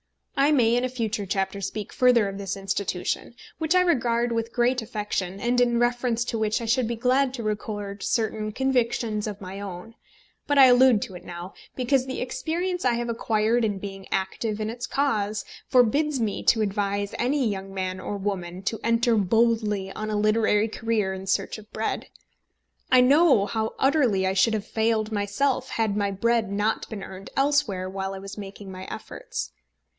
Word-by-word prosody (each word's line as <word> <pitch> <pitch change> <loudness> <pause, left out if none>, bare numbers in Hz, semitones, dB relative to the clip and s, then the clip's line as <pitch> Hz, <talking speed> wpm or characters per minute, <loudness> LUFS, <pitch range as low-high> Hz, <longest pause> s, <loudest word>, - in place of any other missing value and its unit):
I 280 +2 +4
may 240 -5 +4
in 245 - +1
a 255 - 0
future 225 -5 -3
chapter 195 +1 -1
speak 210 +2 -5
further 245 -4 +4
of 195 0 -6
this 195 0 -3
Institution, 195 +2 -2 0.2
which 320 +2 +1
I 365 - +6
regard 240 -8 +1
with 230 0 -2
great 245 +1 +2
affection, 205 -3 -3
and 245 +3 +1
in 240 -1 +3
reference 240 -1 +1
to 230 -2 -2
which 215 0 +1
I 235 - -4
should 230 +1 +2
be 235 - -2
glad 255 +3 +2
to 235 - -5
record 205 -1 -4
certain 215 -2 -1
convictions 235 -3 0
of 205 -1 -5
my 190 +1 -7
own; 195 +2 -7 0.5
but 290 - +2
I 270 - +10
allude 250 -3 +6
to - - -8
it 180 - -9
now, 175 +2 -8 0.2
because 255 +1 +1
the 260 - -4
experience 350 +7 -2
I 245 -2 +3
have 240 0 -2
acquired 225 0 +1
in 205 -3 0
being 195 0 -8
active 205 +3 -2
in 215 0 -2
its 240 +1 -5
cause 215 -7 0 0.2
forbids 270 +4 +3
me 215 -3 -1
to 225 - +4
advise 200 -1 -1
any 260 +1 +1
young 195 -2 -4
man 185 -1 -3
or 205 +2 -4
woman 190 -2 -4
to 220 +3 -2
enter 230 0 +3
boldly 210 -1 +1
on 215 +2 -5
a 210 - 0
literary 215 0 +3
career 220 -3 -1
in 190 0 -7
search 190 - 0
of 215 0 -16
bread. 220 - -3 0.8
I 255 -1 +7
know 270 -4 +5
how 220 +2 -2
utterly 265 -9 +2
I 190 - +1
should 200 +4 +3
have 210 - -3
failed 220 -1 0
myself 250 +6 0
had 220 -3 0
my 205 -1 +1
bread 220 +1 +1
not 210 +2 -1
been 210 -3 -6
earned 190 +1 -9
elsewhere 275 -10 +1
while 195 0 -4
I - - -7
was 195 +2 -8
making 195 -1 -8
my 185 0 -8
efforts. - - -6
220 Hz, 185 wpm, -25 LUFS, 200-245 Hz, 0.8 s, I